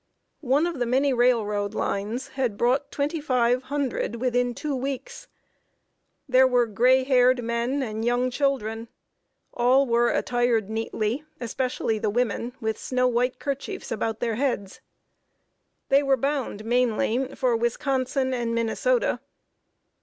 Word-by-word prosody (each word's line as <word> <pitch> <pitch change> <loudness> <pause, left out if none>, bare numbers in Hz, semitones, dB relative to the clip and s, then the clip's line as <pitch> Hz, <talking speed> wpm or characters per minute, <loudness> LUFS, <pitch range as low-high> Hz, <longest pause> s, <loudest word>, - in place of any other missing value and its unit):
One 300 +4 +3
of 340 -5 -3
the 245 - 0
many 265 +3 +2
railroad 215 -5 +1
lines 215 +6 -2
had 250 -6 -2
brought 260 +5 +1
twenty 295 +3 -2
five 250 -3 +2
hundred 270 -4 -2
within 245 0 0
two 295 +2 -3
weeks. 275 - -5 1.0
There 260 0 +5
were 245 -1 +3
gray 250 +5 +3
haired 255 -1 +3
men 235 +4 -1
and 220 -2 -4
young 245 +2 +1
children. 235 -5 -1 0.7
All 255 +3 +4
were 235 -1 +2
attired 240 -4 0
neatly, 225 +3 -2 0.2
especially 235 -2 -2
the 210 - 0
women, 240 +1 -1
with 220 -1 -2
snow 255 0 +1
white 250 +1 0
kerchiefs 280 -1 -5
about 225 0 -2
their 230 -2 0
heads. 240 -8 -2 1.1
They 275 +1 +5
were 275 -2 +2
bound, 265 -5 -2
mainly, 245 +2 0
for 250 -3 +1
Wisconsin 260 +3 0
and 235 -2 -1
Minnesota. - - +1
245 Hz, 130 wpm, -25 LUFS, 230-265 Hz, 1.1 s, There